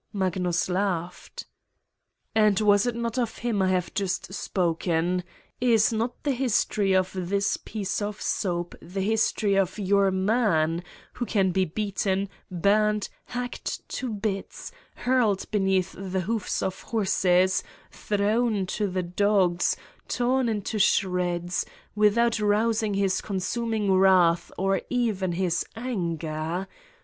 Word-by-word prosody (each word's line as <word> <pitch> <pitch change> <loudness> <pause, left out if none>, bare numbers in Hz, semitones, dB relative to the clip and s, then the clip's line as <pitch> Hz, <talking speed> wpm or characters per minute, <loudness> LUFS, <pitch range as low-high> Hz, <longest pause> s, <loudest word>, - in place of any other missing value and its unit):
Magnus 185 -3 0
laughed: 180 -2 -3 0.5
" - - -55 0.3
And 215 -3 +4
was 205 +1 +4
it 240 - -1
not 235 +1 -2
of 235 -3 -2
him 230 -4 -1
I 190 - +3
have 180 -2 0
just 190 -1 -2
spoken? 175 -1 0 0.4
Is 230 -2 +3
not 230 +2 -2
the 290 - +1
history 220 -6 +1
of 185 0 +2
this 195 +2 0
piece 205 -1 -4
of 205 0 -3
soap 175 -3 -2
the 190 +3 -5
history 215 -1 +1
of 195 -1 +1
your 200 -1 +3
man, 190 -5 +1 0.3
who 240 - -4
can 195 -3 +2
be 190 +1 +2
beaten, 195 +1 -1 0.2
burned, 210 +3 +2 0.2
hacked 245 0 -5
to 255 -3 -3
bits, 205 - -4 0.2
hurled 240 -6 +1
beneath 190 -2 +1
the 190 -1 -3
hoofs 215 +2 -2
of 190 - -3
horses, 185 -4 +2 0.3
thrown 210 0 0
to 205 +3 -1
the 185 -1 -2
dogs, 180 -1 +2 0.3
torn 250 0 +1
into 215 0 -2
shreds 180 -3 +1 0.3
without 220 +2 +3
rousing 215 0 +1
his 195 -1 +1
consuming 210 +1 -1
wrath 185 -3 +4
or 195 -1 +1
even 215 -8 0
his 175 -1 0
anger? 170 -6 -3
195 Hz, 125 wpm, -26 LUFS, 185-215 Hz, 0.5 s, And